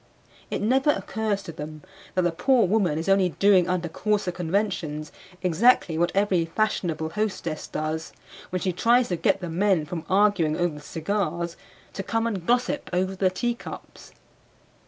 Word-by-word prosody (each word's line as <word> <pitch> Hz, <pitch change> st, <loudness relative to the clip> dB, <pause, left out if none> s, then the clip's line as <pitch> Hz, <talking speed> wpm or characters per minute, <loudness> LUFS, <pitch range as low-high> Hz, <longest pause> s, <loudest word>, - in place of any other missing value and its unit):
It -, -, -2 dB
never 265 Hz, +6 st, +3 dB
occurs 215 Hz, -7 st, -1 dB
to 165 Hz, -, -7 dB
them 155 Hz, 0 st, -8 dB, 0.3 s
that 185 Hz, -, +2 dB
the 175 Hz, -, +2 dB
poor 240 Hz, +7 st, +3 dB
woman 185 Hz, -5 st, +1 dB
is 160 Hz, -, -3 dB
only 195 Hz, -2 st, +4 dB
doing 185 Hz, +1 st, +4 dB
under 180 Hz, -1 st, 0 dB
coarser 205 Hz, +2 st, -1 dB
conventions 175 Hz, -4 st, -2 dB, 0.3 s
exactly 180 Hz, 0 st, +3 dB
what 170 Hz, +2 st, +1 dB
every 195 Hz, -4 st, +2 dB
fashionable 165 Hz, -4 st, -1 dB
hostess 190 Hz, -7 st, -3 dB
does 155 Hz, +1 st, -3 dB, 0.4 s
when 185 Hz, 0 st, -2 dB
she 185 Hz, -, 0 dB
tries 235 Hz, +6 st, +3 dB
to 180 Hz, -, 0 dB
get 195 Hz, -, +1 dB
the 175 Hz, -, -4 dB
men 185 Hz, -2 st, +2 dB
from 165 Hz, +1 st, -5 dB
arguing 190 Hz, -6 st, +3 dB
over 175 Hz, -2 st, 0 dB
the 150 Hz, -, -9 dB
cigars 170 Hz, +1 st, -2 dB, 0.4 s
to -, -, -4 dB
come 225 Hz, +3 st, -1 dB
and 195 Hz, -7 st, -3 dB
gossip 245 Hz, +4 st, +1 dB
over 185 Hz, +2 st, 0 dB
the 185 Hz, 0 st, +2 dB
teacups. 235 Hz, +6 st, -5 dB
185 Hz, 160 wpm, -25 LUFS, 165-210 Hz, 0.4 s, only